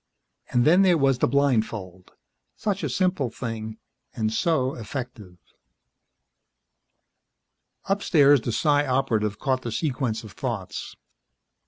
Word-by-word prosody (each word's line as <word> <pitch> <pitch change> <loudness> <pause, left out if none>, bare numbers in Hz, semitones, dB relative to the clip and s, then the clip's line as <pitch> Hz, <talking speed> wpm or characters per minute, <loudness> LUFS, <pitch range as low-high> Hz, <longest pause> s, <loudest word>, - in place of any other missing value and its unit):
And 120 -1 +2
then 175 +5 +6
there 180 -3 +4
was 135 -3 +2
the - - +3
blindfold. 110 -9 -1 0.4
Such 200 -2 -2
a - - -2
simple 180 -9 0
thing, 110 -2 -6 0.4
and 110 -2 -1
so 135 -1 +1
effective. 115 -6 -7 2.5
Upstairs, 150 - +4
the 120 - -3
Psi 145 +4 +2
Operative 115 -6 0
caught 130 -3 -1
the 120 - -5
sequence 125 -5 -2
of 110 - -10
thoughts. - - -5
130 Hz, 115 wpm, -25 LUFS, 110-145 Hz, 2.5 s, then